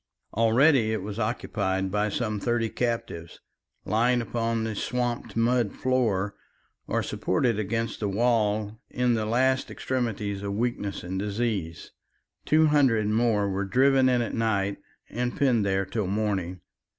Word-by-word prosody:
Already 115 +2 +4
it 105 -4 -2
was 105 +2 -5
occupied 100 -4 -1
by 105 +1 +1
some 105 0 -2
thirty 115 +1 0
captives, 115 -10 -3 0.5
lying 120 +3 +2
upon 115 -1 -1
the 110 -1 -2
swamped 120 +3 -2
mud 120 -1 +2
floor 110 -7 0 0.5
or - - 0
supported 110 +3 0
against 115 +2 -2
the 105 - -1
wall 110 -1 +1
in 125 -1 +1
the 110 -2 -1
last 130 +3 +1
extremities 105 -6 -3
of 100 0 -3
weakness 110 -3 -2
and 95 +2 -4
disease. 100 -5 -3 0.5
Two 155 +1 +4
hundred 135 -8 +3
more 110 -2 +2
were 100 0 -1
driven 130 +5 +3
in 125 -1 +2
at 115 - -5
night 100 -3 0 0.3
and 125 +1 -3
penned 125 -6 +3
there 95 -1 0
till 100 +1 -2
morning. 95 -3 -2
110 Hz, 140 wpm, -26 LUFS, 100-120 Hz, 0.5 s, Already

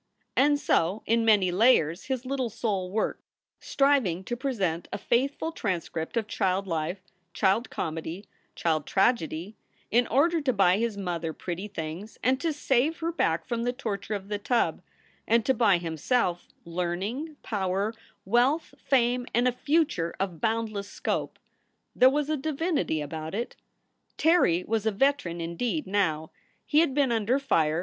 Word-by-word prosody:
And 290 +2 +4
so 185 - +1
in 230 +1 +2
many 205 -5 +4
layers 180 -5 +3
his 260 -1 -3
little 260 -2 -1
soul 205 -4 -2
worked, 215 +3 -1 0.4
striving 270 - +2
to 240 - -3
present 200 - -2
a - - -2
faithful 275 +9 0
transcript 175 - -3
of 225 - +1
child 195 -3 0
life, 165 +1 -2 0.4
child 205 +4 +2
comedy, 165 +4 -4 0.3
child 155 -3 0
tragedy, 195 -3 0 0.3
in 240 +2 +3
order 320 +6 +3
to 275 -3 +1
buy 195 -2 +4
his 230 -3 -1
mother 170 -4 -3
pretty 180 +5 -5
things 175 +2 -6
and 260 +2 +2
to 330 - +1
save 290 +1 +1
her 330 0 -2
back 170 - 0
from 235 -2 -2
the 245 +1 0
torture 215 -5 -4
of 195 -1 -6
the 205 0 -3
tub, 235 +3 0 0.5
and 230 -1 +3
to 265 - +3
buy 215 -6 +4
himself 175 - -1 0.2
learning, 185 - -3
power, 200 +1 -1 0.3
wealth, 250 - +2
fame, 245 -1 +1
and 240 +1 +3
a - - +3
future 280 - 0
of 180 -5 -3
bound 225 0 0
less 200 -1 -5
scope. - - -3 0.6
There 255 - +7
was 290 +1 0
a 310 - 0
divinity 300 - -1
about 155 +3 -5
it. 235 +3 -3 0.6
Terry 315 - +3
was 225 0 0
a - - +3
veteran 205 -7 +1
indeed 195 - -2
now. 160 -6 0 0.3
He 300 - +3
had 310 -5 +2
been 280 -4 +3
under 230 +3 +2
fire. 160 - +1
220 Hz, 155 wpm, -27 LUFS, 180-260 Hz, 0.6 s, There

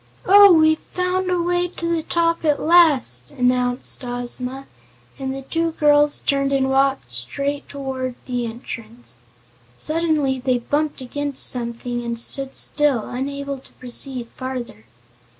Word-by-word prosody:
"Oh, 400 +1 +8
we've 315 -1 +4
found 365 0 -2
a 360 -1 +1
way 350 +1 0
to 340 -1 -6
the 325 - -1
top 335 +1 0
at 300 -2 +2
last," 290 - +4
announced 250 0 0
Ozma, 250 +2 -2 0.5
and 265 -1 -3
the 270 0 -6
two 330 +4 -2
girls 295 -1 +3
turned 275 -1 +1
and 265 -1 +1
walked 270 - +1
straight 280 - -4
toward 265 -2 -5
the 245 -2 -3
entrance. 230 - -9 0.6
Suddenly 305 - 0
they 255 0 0
bumped 290 +4 -2
against 285 +2 0
something 240 0 -3
and 235 0 -4
stood 270 +3 +1
still, 290 -7 +1
unable 280 +2 -4
to - - -19
proceed 250 0 -1
farther. 255 - -6
270 Hz, 135 wpm, -21 LUFS, 245-305 Hz, 0.6 s, Oh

